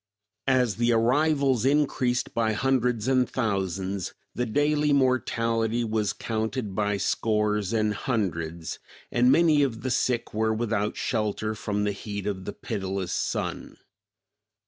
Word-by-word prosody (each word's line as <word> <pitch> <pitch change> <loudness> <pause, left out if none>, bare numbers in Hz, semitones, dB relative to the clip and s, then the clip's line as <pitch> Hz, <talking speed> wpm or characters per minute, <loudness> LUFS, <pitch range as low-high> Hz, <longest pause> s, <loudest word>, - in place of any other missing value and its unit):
As 125 -6 +2
the 120 0 +2
arrivals 135 +2 +2
increased 135 -3 +1
by 110 -1 +1
hundreds 125 -1 +1
and 130 -2 +3
thousands, 95 -4 -2 0.2
the 125 0 -2
daily 145 +4 +2
mortality 120 -4 +1
was 110 -3 0
counted 110 0 -3
by 105 0 0
scores 105 0 0
and 110 -2 +1
hundreds, 85 -8 -3 0.3
and 125 +1 +4
many 155 0 +5
of 120 -5 0
the 130 - -1
sick 120 -1 0
were 110 +1 +1
without 110 -2 -1
shelter 110 -1 -1
from 105 -1 -2
the 105 - +1
heat 100 0 -6
of 95 -2 -3
the - - -4
pitiless 95 -2 -4
sun. - - -3
115 Hz, 130 wpm, -26 LUFS, 105-125 Hz, 0.3 s, many